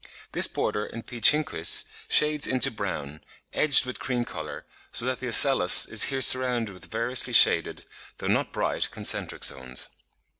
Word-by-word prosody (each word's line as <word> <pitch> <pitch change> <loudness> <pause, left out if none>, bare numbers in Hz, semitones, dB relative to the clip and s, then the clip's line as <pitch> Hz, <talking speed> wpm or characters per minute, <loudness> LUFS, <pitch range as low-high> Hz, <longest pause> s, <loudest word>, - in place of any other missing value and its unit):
This - - +4
border 105 - -5
in 115 - -11
P. 120 -2 -12
chinquis 150 - +3 0.2
shades 150 -1 +3
into 130 -2 0
brown, 85 -9 -8 0.3
edged 145 -3 +1
with 125 - -9
cream 125 -2 -4
colour, 80 -7 -10 0.3
so 115 - -2
that 130 0 -4
the 130 - -7
ocellus 120 -5 +5
is 115 - +1
here 135 -1 -2
surrounded 125 -5 0
with 90 - -15
variously 115 +3 -3
shaded, - - +3 0.3
though - - -10
not - - -2
bright, - - -3
concentric - - -1
zones. 65 -1 -2
120 Hz, 155 wpm, -23 LUFS, 100-130 Hz, 0.3 s, ocellus